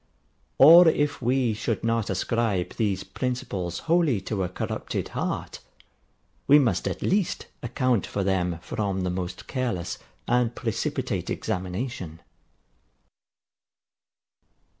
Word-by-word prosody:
Or 165 +5 +9
if 145 -3 +1
we 125 -1 +2
should 110 +1 -2
not 115 -2 0
ascribe 105 -6 0
these 100 -4 0
principles 100 -10 -3
wholly 165 - +3
to 100 +1 -3
a 90 - -2
corrupted 90 - -4
heart, - - -3 0.9
we 145 - +8
must 135 -6 +2
at - - -3
least 195 -1 0 0.2
account 125 -2 0
for 100 - -2
them 90 -3 0
from 100 -3 -2
the 90 -1 -1
most 90 0 -5
careless 120 -10 -3 0.3
and 120 -1 +2
precipitate 115 -4 -2
examination. 90 -2 -4
115 Hz, 110 wpm, -26 LUFS, 95-130 Hz, 0.9 s, Or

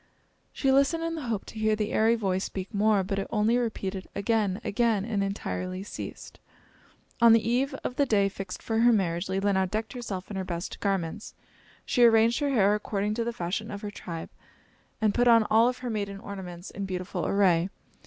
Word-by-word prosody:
She 270 - +1
listened 280 +5 +3
in 330 0 -2
the 310 -6 -5
hope 220 -4 -2
to 220 - -9
hear 215 0 +2
the 210 -1 -2
airy 225 +2 +4
voice 190 -4 -1
speak 190 +3 -6
more; 205 -1 +3
but 195 +1 -2
it 195 - -3
only 225 +2 +2
repeated, 195 -5 -3
"Again! 200 -2 0
again!" 215 -2 +1
and 210 -3 -1
entirely 185 -1 -3
ceased. 205 - -8 0.8
On 230 -1 +8
the 225 -1 +3
eve 265 +4 +1
of 250 - -4
the 285 - +3
day 200 -4 +3
fixed 195 -1 -7
for 225 -1 0
her 240 +1 +6
marriage, 180 -4 0
Leelinau 190 0 +1
decked 215 +3 -3
herself 210 -7 -6
in 200 - -4
her 190 - -2
best 175 -1 -5
garments. 195 -1 -2 0.5
She 245 - +2
arranged 230 +1 +5
her 290 -1 0
hair 205 -6 +4
according 210 0 -1
to 230 +2 -1
the 235 - -2
fashion 215 +2 -3
of 205 -2 -6
her 210 - -5
tribe 165 -5 -7 0.7
and 215 -2 +2
put 245 0 +2
on 230 -2 +6
all 225 +3 +6
of 250 - -4
her - - -1
maiden 200 -2 -3
ornaments 185 -3 -8
in 200 - -5
beautiful 185 -1 -3
array. 185 -3 +3
210 Hz, 200 wpm, -27 LUFS, 190-230 Hz, 0.8 s, On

